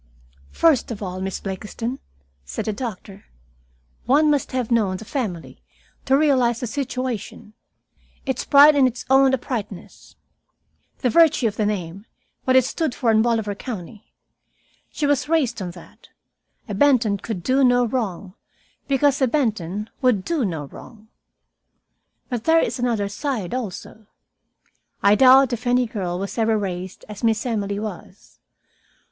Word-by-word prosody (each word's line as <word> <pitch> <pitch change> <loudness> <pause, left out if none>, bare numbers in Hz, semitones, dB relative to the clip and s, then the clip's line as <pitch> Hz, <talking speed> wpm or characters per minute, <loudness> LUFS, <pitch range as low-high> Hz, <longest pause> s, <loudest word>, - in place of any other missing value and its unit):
"First 315 -7 +2
of 220 -3 -6
all, 185 -1 -5
Miss 190 0 -3
Blakiston," 220 +6 -5 0.4
said 65 +2 -5
the 215 - -1
doctor, 205 -3 -7 0.8
"one 300 +3 +4
must 290 -2 -1
have 250 -2 -2
known 205 -5 +1
the 220 - -10
family 210 - -5 0.4
to 270 0 +3
realize 255 -6 +2
the - - -3
situation 250 -4 -5 0.7
its 265 -2 -2
pride 290 +1 +7
in 270 -2 +5
its 245 -1 -6
own 270 0 +6
uprightness. 225 -7 -5 0.9
The 250 - +1
virtue 320 -4 +4
of 210 - -3
the 215 -2 0
name, 195 0 -4 0.4
what 260 - +3
it 260 -1 +5
stood 310 0 -2
for 235 -4 +1
in 220 0 +4
Bolivar 225 -3 0
County. 205 -1 -8 0.8
She 300 - -3
was 285 0 0
raised 305 -10 +1
on 180 - -4
that. 175 - -16 0.6
A 210 - -5
Benton 225 -3 +3
could 190 -4 -5
do 265 +5 +2
no 245 -1 +4
wrong, 205 -6 -3 0.5
because 280 0 +2
a 260 - +4
Benton 210 - -1
would 245 -8 +2
do 325 -6 0
no 160 -8 -3
wrong. 220 - -14 1.2
"But 245 -4 -4
there 325 0 +5
is 275 - -1
another 230 -5 0
side, 220 - -4
also. 220 -2 -6 1.0
I 200 - +6
doubt 260 +3 +6
if 240 +2 -4
any 245 +1 +3
girl 190 -7 -4
was 195 +5 -5
ever 220 -1 +2
raised 185 -2 -5
as 210 0 -10
Miss 225 0 +1
Emily 205 -4 -2
was. 205 -2 -9
230 Hz, 150 wpm, -22 LUFS, 200-260 Hz, 1.2 s, pride